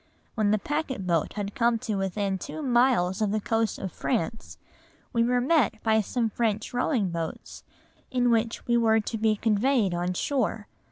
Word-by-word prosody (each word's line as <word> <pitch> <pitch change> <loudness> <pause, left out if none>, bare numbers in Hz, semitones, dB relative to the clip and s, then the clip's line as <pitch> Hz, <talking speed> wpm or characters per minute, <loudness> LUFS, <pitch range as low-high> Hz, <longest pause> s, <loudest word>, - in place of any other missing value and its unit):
When 215 -3 +1
the 215 - +3
packet 270 -4 -3
boat 170 -3 0
had 205 -1 -4
come 235 0 +2
to 225 -1 -4
within 195 0 -1
two 310 - -6
miles 240 -7 +2
of 215 - +2
the 215 +2 0
coast 225 +1 0
of 190 - -5
France, 165 +11 -3 0.6
we 230 - +3
were 245 +1 +2
met 265 -3 +2
by 220 -1 +3
some 230 +3 -1
French 220 0 -1
rowing 245 - 0
boats 165 -1 -6 0.5
in 245 -1 +2
which 230 0 0
we 235 0 +2
were 225 -1 +4
to 220 +1 -4
be 220 0 +2
conveyed 220 -1 +1
on 175 +1 -1
shore. 225 -3 -1
220 Hz, 175 wpm, -27 LUFS, 200-240 Hz, 0.6 s, were